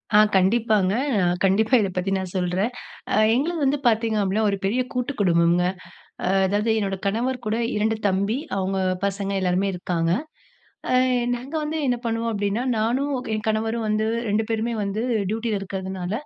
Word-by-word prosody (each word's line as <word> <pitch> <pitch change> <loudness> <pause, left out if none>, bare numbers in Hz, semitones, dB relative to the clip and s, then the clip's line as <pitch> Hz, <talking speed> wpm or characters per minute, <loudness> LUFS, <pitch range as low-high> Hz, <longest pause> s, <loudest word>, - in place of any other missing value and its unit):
ஆ - - +8 0.2
கண்டிப்பாங்க. 200 0 +3 0.5
கண்டிப்பா 210 +5 +2
இத 200 -3 +1
பத்தி 185 +1 -1
நான் 185 -2 -5
சொல்றேன். 185 +4 0 0.4
அ - - +3 0.2
எங்களது 325 +7 0
வந்து 275 +1 +2
பார்த்தீங்க 225 -1 +2
அப்படின்னா 200 +2 +1
ஒரு 200 - -1
பெரிய 230 +6 +1
கூட்டு 250 +2 -1
குடும்பம்ங்க. 170 -1 +3 0.6
அ - - 0 0.2
அதாவது 205 +4 0
என்னோட 195 -2 -1
கணவர் 240 +6 0
கூட 215 +1 0 0.2
2 220 +1 +1
தம்பி 200 +4 0 0.2
அவங்க 190 0 -1 0.3
பசங்க 200 0 -2
எல்லாருமே 185 +1 +1
இருக்காங்க. 170 -2 -1 0.8
ஆ - - +2 0.4
நாங்க 255 +5 -9
வந்து 305 +1 -2
என்ன 245 -1 +1
பண்ணுவோம் 230 0 -1
அப்படின்னா 205 +3 -1
நானும், 250 +6 0 0.2
என் 215 0 -3
கணவரும் 220 +1 0
வந்து 215 0 +1 0.2
2 210 +2 +1
பேருமே 225 +1 -1
வந்து 200 +2 -2 0.3
டியூட்டியில 220 -2 -1
இருக்கிறதுனால, 190 -2 -5
210 Hz, 155 wpm, -23 LUFS, 190-230 Hz, 0.8 s, ஆ